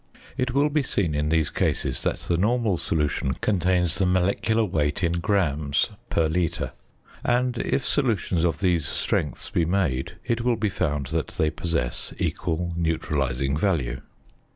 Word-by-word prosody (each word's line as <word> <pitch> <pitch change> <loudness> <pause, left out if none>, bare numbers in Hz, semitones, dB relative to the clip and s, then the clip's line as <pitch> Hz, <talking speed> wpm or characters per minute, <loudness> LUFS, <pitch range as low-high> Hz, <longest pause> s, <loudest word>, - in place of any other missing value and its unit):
It 130 -1 -1
will 145 +2 +3
be 155 0 +2
seen 95 - 0
in 75 +1 0
these 80 -2 +2
cases 65 -3 0
that - - -1
the 85 - 0
normal 105 0 +1
solution 75 -4 0
contains 90 -3 +1
the 95 - +3
molecular 100 +5 +2
weight 75 -2 0
in 85 - +3
grams 80 -6 +1 0.2
per 80 - +2
litre; 85 0 -1 0.5
and, 125 0 +1
if 135 - 0
solutions 105 - +1
of 85 +3 0
these 85 -6 +2
strengths 75 -2 -1
be 85 - +2
made, 80 -5 0
it 115 0 0
will 120 0 +2
be 105 -1 0
found 75 -5 -1
that - - 0
they 80 -1 +2
possess 80 -7 -3
equal 85 0 -1
neutralising 70 -5 0
value. 75 -8 0
85 Hz, 155 wpm, -25 LUFS, 75-100 Hz, 0.5 s, will